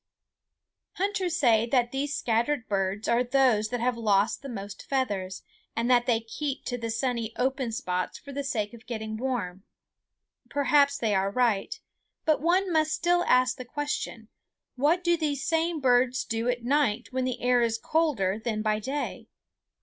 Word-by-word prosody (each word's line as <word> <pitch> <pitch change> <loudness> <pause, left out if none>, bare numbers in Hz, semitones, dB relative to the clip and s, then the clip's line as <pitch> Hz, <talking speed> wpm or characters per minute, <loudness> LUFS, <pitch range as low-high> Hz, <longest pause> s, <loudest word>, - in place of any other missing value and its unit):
Hunters 380 -3 -1
say 230 -5 +4
that 240 -1 +2
these 280 +2 -2
scattered 235 +2 0
birds 195 0 -1
are 235 +1 +3
those 250 -4 +3
that 245 0 -3
have 250 0 +1
lost 210 -2 +1
the 275 - -7
most 200 -3 -7
feathers, 205 -9 -2 0.3
and 235 +2 +1
that 240 -1 +4
they 230 -2 +2
keep 270 +5 -4
to 245 - -2
the 230 0 -3
sunny 230 -1 -2
open 260 -1 0
spots 185 -4 -2
for 280 - -11
the 280 +1 -3
sake 215 -6 -2
of 235 +1 -14
getting 220 -2 -4
warm. 215 -7 -3 0.9
Perhaps 285 0 +3
they 225 -6 0
are 195 0 +2
right; 235 - 0 0.5
but 310 -3 +2
one 360 +3 +2
must 310 -1 +2
still 350 0 +2
ask 255 0 +3
the 255 - -6
question, 245 -4 -4 0.5
what 305 +7 +2
do 345 -1 +3
these 295 -4 -2
same 330 0 +1
birds 255 -1 +2
do 225 +2 -1
at 245 -1 -1
night 245 -3 +1
when 260 0 0
the 255 -1 -2
air 245 0 +3
is 230 -1 +1
colder 225 - 0
than 215 -3 -2
by 215 -1 +1
day? 275 +6 -4
245 Hz, 170 wpm, -27 LUFS, 225-280 Hz, 0.9 s, say